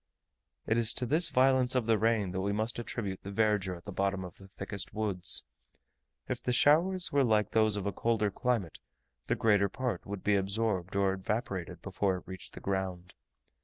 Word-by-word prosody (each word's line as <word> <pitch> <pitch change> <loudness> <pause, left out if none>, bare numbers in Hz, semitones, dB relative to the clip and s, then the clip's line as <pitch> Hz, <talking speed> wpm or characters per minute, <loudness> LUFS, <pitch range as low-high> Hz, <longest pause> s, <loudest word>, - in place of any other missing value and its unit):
It 110 +1 +1
is 115 -1 +3
to 125 - -2
this 155 +7 +3
violence 130 0 +3
of 125 -3 +1
the 110 -2 +2
rain 110 -3 +1
that 95 +1 -2
we 100 +1 -1
must 110 +3 -1
attribute 105 -5 -4
the 100 - -8
verdure 100 -3 +1
at 85 - -16
the 100 - -7
bottom 95 0 -1
of 90 - -11
the 95 - -14
thickest 95 0 -7
woods: 100 -4 +2 0.8
if - - -3
the 125 - -1
showers 170 +8 +4
were 140 -1 +3
like 105 -3 +2
those 110 -2 +3
of 100 -1 -3
a 100 - 0
colder 110 -3 0
climate, 115 -7 -2 0.5
the - - +1
greater 100 -3 +3
part 125 -5 -4
would 100 -1 -6
be 105 - +2
absorbed 100 -2 -1
or 100 -1 +2
evaporated 95 - -4
before 95 -2 -1
it - - -11
reached 95 -3 -9
the - - -7
ground. 95 -2 -3
105 Hz, 195 wpm, -30 LUFS, 95-115 Hz, 0.8 s, showers